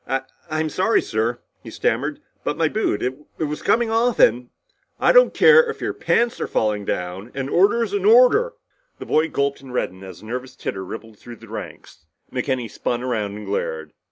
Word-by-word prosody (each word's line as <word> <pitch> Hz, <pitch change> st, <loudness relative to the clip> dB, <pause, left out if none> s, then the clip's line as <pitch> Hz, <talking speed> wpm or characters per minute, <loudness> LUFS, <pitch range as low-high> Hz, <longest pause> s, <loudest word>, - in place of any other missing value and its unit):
"I 135 Hz, +1 st, 0 dB, 0.3 s
I'm 155 Hz, 0 st, -1 dB
sorry, 190 Hz, +8 st, +2 dB
sir," 115 Hz, +2 st, -1 dB, 0.2 s
he -, -, -10 dB
stammered. 145 Hz, +7 st, -1 dB, 0.2 s
"But 150 Hz, -, -2 dB
my 165 Hz, -1 st, +2 dB
boot 210 Hz, -, -1 dB
it 130 Hz, +1 st, -2 dB, 0.2 s
was 150 Hz, -1 st, -3 dB
coming 230 Hz, -1 st, +2 dB
off 235 Hz, +2 st, +2 dB
and 120 Hz, +2 st, +3 dB, 0.2 s
" -, -, -46 dB
"I -, -, +4 dB
don't -, -, +6 dB
care 470 Hz, 0 st, +6 dB
if -, -, -5 dB
your -, -, -2 dB
pants 235 Hz, 0 st, 0 dB
are -, -, -1 dB
falling 105 Hz, -2 st, 0 dB
down, 90 Hz, +5 st, -4 dB
an 135 Hz, 0 st, -3 dB
order's 205 Hz, +5 st, +2 dB
an 200 Hz, -2 st, -1 dB
order!" 250 Hz, -, +5 dB, 0.4 s
The -, -, -8 dB
boy 160 Hz, +1 st, +2 dB
gulped 140 Hz, -2 st, -1 dB
and 135 Hz, -2 st, -11 dB
reddened 95 Hz, -6 st, -3 dB
as 95 Hz, 0 st, -11 dB
a -, -, -11 dB
nervous 125 Hz, +3 st, -6 dB
titter 95 Hz, -, -5 dB
rippled 110 Hz, +3 st, -9 dB
through 120 Hz, -, -10 dB
the -, -, -15 dB
ranks. 80 Hz, -, -9 dB, 0.3 s
McKenny 125 Hz, -1 st, -1 dB
spun 120 Hz, +3 st, -3 dB
around 110 Hz, -5 st, -2 dB
and 105 Hz, -, -8 dB
glared. 80 Hz, -5 st, -3 dB
130 Hz, 195 wpm, -22 LUFS, -, 0.4 s, don't